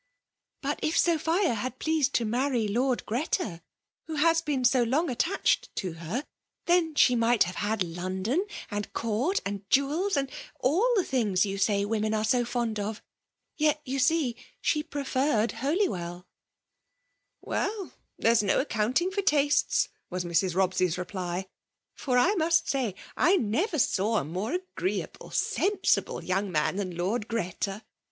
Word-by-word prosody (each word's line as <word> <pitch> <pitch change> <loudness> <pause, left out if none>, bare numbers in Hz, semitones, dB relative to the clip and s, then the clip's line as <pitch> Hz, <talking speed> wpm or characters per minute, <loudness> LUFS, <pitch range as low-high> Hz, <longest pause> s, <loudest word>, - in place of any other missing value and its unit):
But 285 +2 -1
if 310 - 0
Sophia 335 0 +2
had 250 +3 -4
pleased 315 -3 +1
to 235 - +2
marry 240 0 0
Lord 245 +4 0
Greta, 225 - -2 0.5
who 320 - -4
has 330 +2 +3
been 285 -5 -1
so 255 0 +4
long 270 +7 +1
attached 350 +11 +1
to 185 -4 -3
her, 170 - -4 0.4
then 340 -3 +2
she 250 -3 +5
might 230 -1 +4
have 180 +2 -6
had 205 -1 0
London, 185 - -2 0.2
and 205 0 -3
court, 235 - 0
and 200 0 -3
jewels, 300 +7 +2
and 275 -1 -1 0.3
all 365 - +2
the 390 - +3
things 215 - +1
you 195 0 -3
say 200 0 +2
women 215 0 0
are 215 - 0
so 245 +3 +2
fond 235 -3 -2
of, 210 +2 -4 0.3
— - - -54
yet, 305 0 +3
you 270 +1 -2
see, 275 -3 +2 0.2
she 300 - +1
preferred 270 -5 0
HolyweU 285 - 0
r 175 +1 -7 0.6
" - - -51
Well 410 -2 -3
— - - -51
there 230 - +3
is 235 - +4
no 200 -2 +2
accounting 255 - 0
for 400 +1 -1
tastes," 290 -5 +2 0.2
was 180 -1 -3
Mrs. 175 +1 +1
Robscy's 185 -2 +1
reply, 180 0 -4 0.3
" - - -58
for 255 -3 -1
I 355 +11 +4
must 335 -2 +2
say 255 -8 -1 0.2
I 360 +5 +4
never 315 - 0
saw 220 -3 +2
a - - +1
more 185 - -3
agreeable, 370 +1 -4
sensible 410 +1 0
young 190 +1 -1
man 155 +3 +1
than 185 -4 -3
Lord 205 +5 -1
Greta. 200 -1 -3
240 Hz, 160 wpm, -28 LUFS, 200-310 Hz, 0.6 s, she